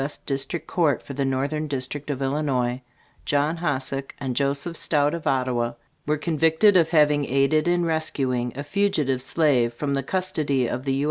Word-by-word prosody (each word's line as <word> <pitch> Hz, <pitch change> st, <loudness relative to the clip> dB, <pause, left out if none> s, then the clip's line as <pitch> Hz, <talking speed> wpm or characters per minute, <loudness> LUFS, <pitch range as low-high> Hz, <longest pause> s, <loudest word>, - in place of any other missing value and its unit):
S. 145 Hz, +2 st, -1 dB
District 135 Hz, +4 st, -2 dB
Court 160 Hz, -7 st, 0 dB
for 140 Hz, -, -8 dB
the 140 Hz, 0 st, -1 dB
Northern 140 Hz, +4 st, -1 dB
District 140 Hz, +1 st, -3 dB
of 140 Hz, -1 st, -2 dB
Illinois, 135 Hz, -3 st, -1 dB, 0.4 s
JOHN 145 Hz, +3 st, +1 dB
HOSSACK 135 Hz, -4 st, -2 dB
and 130 Hz, -3 st, -3 dB
JOSEPH 140 Hz, +5 st, 0 dB
STOUT, 145 Hz, -2 st, +2 dB
of 170 Hz, -2 st, -4 dB
Ottawa, 125 Hz, -3 st, 0 dB, 0.3 s
were 150 Hz, +1 st, +1 dB
convicted 160 Hz, +5 st, +3 dB
of 165 Hz, -3 st, +4 dB
having 150 Hz, -3 st, +3 dB
aided 140 Hz, +4 st, +2 dB
in 175 Hz, 0 st, +2 dB
rescuing 135 Hz, -6 st, 0 dB
a 140 Hz, -, -4 dB
fugitive 150 Hz, -7 st, 0 dB
slave 130 Hz, -5 st, +1 dB
from 140 Hz, +3 st, -2 dB
the 135 Hz, -, 0 dB
custody 145 Hz, -5 st, -1 dB
of 125 Hz, +3 st, -4 dB
the 135 Hz, -, 0 dB
U. 135 Hz, -, -1 dB
140 Hz, 175 wpm, -24 LUFS, 135-155 Hz, 0.4 s, of